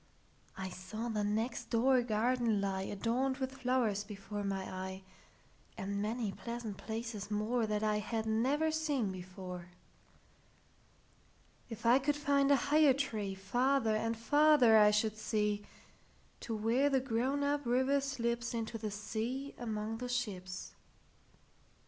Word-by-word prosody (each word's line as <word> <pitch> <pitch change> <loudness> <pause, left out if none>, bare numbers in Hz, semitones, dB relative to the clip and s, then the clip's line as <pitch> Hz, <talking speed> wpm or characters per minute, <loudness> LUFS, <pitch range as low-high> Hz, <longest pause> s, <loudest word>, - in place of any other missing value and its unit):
I 190 -1 -4
saw 185 +6 -5
the 215 -2 -1
next 220 +4 -1
door 250 +2 +4
garden 235 -1 +1
lie, 195 -1 -1
Adorned 235 +7 -1
with 265 -1 -2
flowers, 250 -6 0
before 205 0 -6
my 195 -1 -2
eye, 190 0 -6 0.7
And 200 +1 -3
many 220 0 -1
pleasant 235 -1 -6
places 220 -2 -5
moreThat 215 0 0
I 210 -1 +2
had 220 +1 -2
never 265 +9 +1
seen 295 -9 0
before. 180 -1 -8 2.0
If 225 0 -8
I 240 +3 +6
could 290 +2 +1
find 280 -1 +2
a 285 - +7
higher 290 0 +4
treeFarther 220 +1 0
and 225 +1 -1
farther 290 -1 +5
I 210 0 +7
should 210 +1 +1
see, 210 -1 -1 0.7
To 230 - -4
where 230 +6 +2
the 270 -1 +3
grown 260 +3 0
up 290 0 0
river 260 +3 +3
slipsInto 235 -4 -2
the 215 0 -3
sea 225 +7 -4
among 220 -1 -3
the 250 0 -4
ships. 190 -7 -3
225 Hz, 130 wpm, -34 LUFS, 210-260 Hz, 2.0 s, a